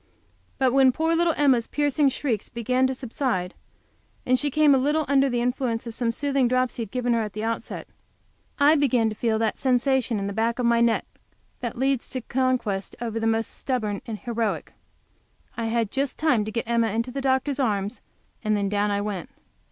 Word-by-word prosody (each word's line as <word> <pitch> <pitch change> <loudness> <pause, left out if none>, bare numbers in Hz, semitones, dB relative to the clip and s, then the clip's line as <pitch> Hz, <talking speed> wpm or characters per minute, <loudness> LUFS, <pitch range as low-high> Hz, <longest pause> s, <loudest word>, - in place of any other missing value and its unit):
But 260 -2 +2
when 265 -1 +6
poor 320 +5 0
little 335 -1 +2
Emma's 265 -5 +3
piercing 290 -1 +2
shrieks 250 -5 -2
began 250 +3 +1
to 260 - -2
subside, 235 -7 -2 0.7
and 255 0 +3
she 295 - 0
came 300 0 +4
a 265 - +4
little 295 +3 +1
under 275 0 +3
the 240 -1 0
influence 245 -2 -1
of 230 - -6
some 235 0 -1
soothing 275 +2 +1
drops 255 0 0
he - - -3
had 220 - -4
given 245 +1 0
her 230 - +2
at 210 -2 -4
the 215 - -4
outset, 230 0 -4 0.7
I 290 +1 +6
began 255 -7 +2
to 215 - -6
feel 225 0 0
that 220 -1 -1
sensation 255 -2 +1
in 200 - -2
the 200 - -3
back 230 +2 0
of 250 - -1
my 235 0 +3
neck 235 -1 +2 0.5
that 240 -2 -4
leads 265 0 0
to 255 - -3
conquest 245 -6 -1
over 230 -1 -3
the 225 - 0
most 225 0 +1
stubborn 215 -7 -2
and 220 -2 -4
the - - -22
most - - -26
heroic. 230 -2 -2 0.8
I 230 - -3
had 225 -2 0
just 275 0 -2
time 250 -9 +2
to 215 - -4
get 230 +1 -3
Emma 230 -1 +2
into 230 +4 -2
the 275 +2 -4
doctor's 265 +1 0
arms, 210 -3 -1 0.4
and 215 -1 +1
then 200 -1 0
down 205 0 +1
I 200 0 0
went. 205 -5 -4
240 Hz, 210 wpm, -25 LUFS, 225-265 Hz, 0.8 s, when